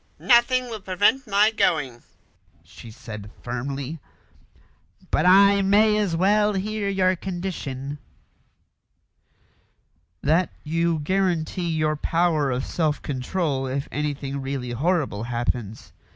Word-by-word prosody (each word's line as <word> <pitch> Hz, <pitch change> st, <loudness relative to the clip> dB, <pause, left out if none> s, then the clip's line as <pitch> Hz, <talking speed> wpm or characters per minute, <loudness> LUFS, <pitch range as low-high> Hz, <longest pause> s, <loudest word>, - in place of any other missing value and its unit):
"Nothing 255 Hz, +1 st, +4 dB
will 220 Hz, -, -5 dB
prevent 205 Hz, +7 st, +1 dB
my 210 Hz, +2 st, +4 dB
going," 135 Hz, -, 0 dB, 0.6 s
she 115 Hz, -, -13 dB
said 110 Hz, -2 st, -9 dB
firmly; 135 Hz, +5 st, -4 dB, 1.1 s
"but -, -, +2 dB
I 200 Hz, +2 st, +6 dB
may 210 Hz, +2 st, +4 dB
as 205 Hz, -5 st, 0 dB
well 210 Hz, +4 st, +3 dB
hear 205 Hz, +1 st, -2 dB
your 185 Hz, -1 st, +2 dB
condition." 160 Hz, -7 st, -5 dB, 2.2 s
"That 160 Hz, +3 st, +2 dB
you 165 Hz, +1 st, 0 dB
guarantee 180 Hz, -1 st, 0 dB
your 155 Hz, -1 st, 0 dB
power 160 Hz, -2 st, +1 dB
of 130 Hz, 0 st, -2 dB
self 155 Hz, -3 st, -1 dB
control 135 Hz, 0 st, -2 dB
if 135 Hz, +2 st, -3 dB
anything 140 Hz, -2 st, -3 dB
really 135 Hz, -2 st, -4 dB
horrible 140 Hz, -, -1 dB
happens. 120 Hz, -2 st, -4 dB
165 Hz, 110 wpm, -24 LUFS, 135-195 Hz, 2.2 s, I